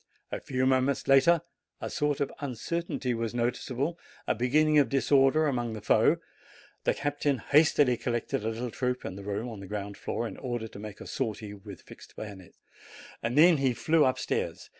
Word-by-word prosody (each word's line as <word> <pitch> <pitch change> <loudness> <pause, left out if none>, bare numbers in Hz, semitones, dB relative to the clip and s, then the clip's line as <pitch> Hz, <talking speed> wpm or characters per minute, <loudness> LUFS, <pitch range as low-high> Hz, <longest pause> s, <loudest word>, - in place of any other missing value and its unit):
A - - -3
few 130 -1 -1
moments 130 +1 +1
later 135 +5 +5 0.4
a - - -4
sort 150 -1 -1
of 140 - -1
uncertainty 140 +1 -3
was 115 0 -3
noticeable, 125 +6 -1 0.3
a - - +2
beginning 150 +6 +3
of 140 - +3
disorder 135 +3 +4
among 120 -5 -1
the 110 - -5
foe. - - +4 0.7
The - - +2
captain 145 -1 0
hastily 145 -3 +4
collected 120 -3 -2
a 110 - 0
little 115 +2 -4
troop 125 0 -2
in 95 - -5
the 100 - -8
room 105 +4 -3
on 110 -4 -7
the 100 - -9
ground 100 0 -5
floor, 115 - -3
in - - -8
order 120 -3 -4
to 105 - -11
make 105 -1 -8
a - - -8
sortie 110 -4 -4
with 100 -2 -11
fixed - - -14
bayonets. 100 -4 -9 0.6
Then 150 +8 +5
he 135 -3 +1
flew 160 +5 +3
up 130 -2 +2
stairs. - - -3
125 Hz, 180 wpm, -29 LUFS, 115-145 Hz, 0.7 s, later